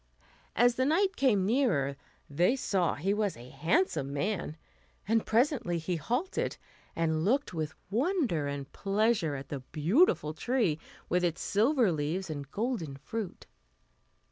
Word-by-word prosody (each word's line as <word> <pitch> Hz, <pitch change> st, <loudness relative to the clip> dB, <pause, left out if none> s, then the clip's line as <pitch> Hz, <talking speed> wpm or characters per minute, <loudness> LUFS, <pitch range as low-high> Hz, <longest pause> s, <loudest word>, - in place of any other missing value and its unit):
As 245 Hz, +2 st, +4 dB
the 260 Hz, -, +2 dB
knight 375 Hz, +6 st, +2 dB
came 220 Hz, -9 st, +3 dB
nearer 195 Hz, -, +2 dB, 0.3 s
they 175 Hz, -, +2 dB
saw 190 Hz, -9 st, 0 dB
he 190 Hz, +7 st, 0 dB
was 205 Hz, -, -1 dB
a 120 Hz, +2 st, -12 dB
handsome 155 Hz, -, +1 dB
man; 165 Hz, +1 st, -2 dB, 0.5 s
and 225 Hz, +1 st, +2 dB
presently 230 Hz, -, +2 dB
he 170 Hz, +2 st, -2 dB
halted, 245 Hz, -, -2 dB, 0.4 s
and 160 Hz, -1 st, 0 dB
looked 260 Hz, -, +1 dB
with 155 Hz, -3 st, -3 dB, 0.2 s
wonder 240 Hz, -, +1 dB
and 140 Hz, -1 st, -5 dB
pleasure 200 Hz, -5 st, +1 dB
at 135 Hz, 0 st, -7 dB
the 140 Hz, -, -4 dB
beautiful 155 Hz, -, +2 dB
tree 215 Hz, -, 0 dB, 0.3 s
with 180 Hz, +1 st, +1 dB
its 170 Hz, -2 st, 0 dB
silver 230 Hz, 0 st, +3 dB
leaves 160 Hz, +4 st, -2 dB
and 140 Hz, -2 st, -6 dB
golden 205 Hz, -, -3 dB
fruit. 215 Hz, +6 st, -6 dB
190 Hz, 140 wpm, -30 LUFS, 155-245 Hz, 0.5 s, As